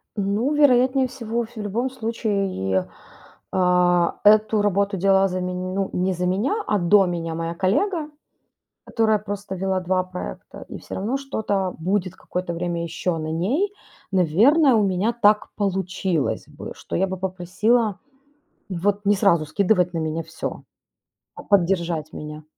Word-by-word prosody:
Ну, 210 +7 0
вероятнее 260 -2 +4
всего 235 -2 -3
ф 235 +2 -13
в 215 - -5
любом 220 +5 -2
случае, 200 - -1 0.6
а. 180 -1 +3 0.3
Эту 215 0 +5
работу 200 0 +1
делала 195 +1 +4
за 185 -1 -3
мень 180 0 -3
ну, 195 0 -1
не 185 +1 0
за 180 0 -2
меня, 200 - 0
а 210 - +2
до 190 +3 +5
меня 165 -2 -3
моя 165 0 -3
коллега, 300 - 0 0.8
которая 220 -2 +1
просто 205 -1 -6
вела 190 0 -1
2 185 0 0
проекта, 185 0 -8
и - - -7
всё - - -8
равно 220 +8 -1
что-то 205 -9 -2
будет 185 +2 -1
какое-то 180 -1 -4
время 170 0 -2
еще 170 +1 -2
на 155 0 -4
ней. 260 - 0 0.4
Наверное, 230 - +4
у 220 - +4
меня 190 +4 0
так 210 -3 +3
получилось 190 -5 -1
бы, - - -9
что - - -6
я 190 - +2
бы 190 0 -4
попросила 190 +4 0 0.7
вот 200 +3 -1
не 205 +1 +4
сразу 170 -6 +3
скидывать 180 +1 +1
на - - -1
меня 160 +1 -2
всё, - - -6 0.7
а - - -10
поддержать 170 -5 +1
меня. 150 0 -8
195 Hz, 150 wpm, -23 LUFS, 180-215 Hz, 0.8 s, Эту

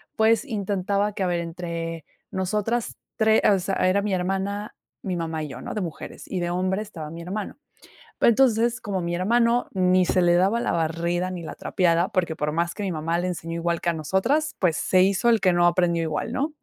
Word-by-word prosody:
pues 225 +5 +3
intentaba 200 -2 -1
que, 195 - -2
a - - +1
ver, 175 -1 0
entre 165 -1 -5 0.3
nosotras 210 +5 -1 0.2
3 220 0 +4
o 200 - +4
sea, 190 +2 -2
era 200 +2 +2
mi 205 -2 -1
hermana, 195 +3 -2 0.3
mi 185 -2 -3
mamá 160 -2 -3
y - - -4
yo, - - -8
¿no?, - - -6
de 210 - -2
mujeres. 170 -3 -7
Y 185 - -3
de 175 0 -1
hombres, 185 +3 0
estaba 160 -6 -7
mi 170 +1 -8
hermano. 200 +7 -5 0.6
Pe - - +4
entonces, 235 0 +3
como 195 -6 -3
mi 170 0 -2
hermano 235 +6 +2
ni 185 -1 +3
se 185 - +2
le 175 0 +4
daba 195 +6 +3
la - - 0
barrida 170 +2 -1
ni 180 -2 -5
la - - -7
trapeada, 175 0 +1
porque 170 -4 -1
por 150 -1 -2
más 170 +1 0
que 210 - -6
mi 195 - -1
mamá 165 +2 -1
le 180 - -1
enseñó 165 -2 -4
igual 170 0 -1
que 170 - +2
a - - 0
nosotras, 230 - 0
pues 170 -4 +1
se 185 -1 +3
hizo 195 +5 +2
el 230 -2 +4
que 185 -2 +4
no 175 0 +4
aprendió 170 -1 +2
igual, 160 +8 -2
¿no? 300 +4 -2
185 Hz, 220 wpm, -24 LUFS, 170-210 Hz, 0.6 s, 3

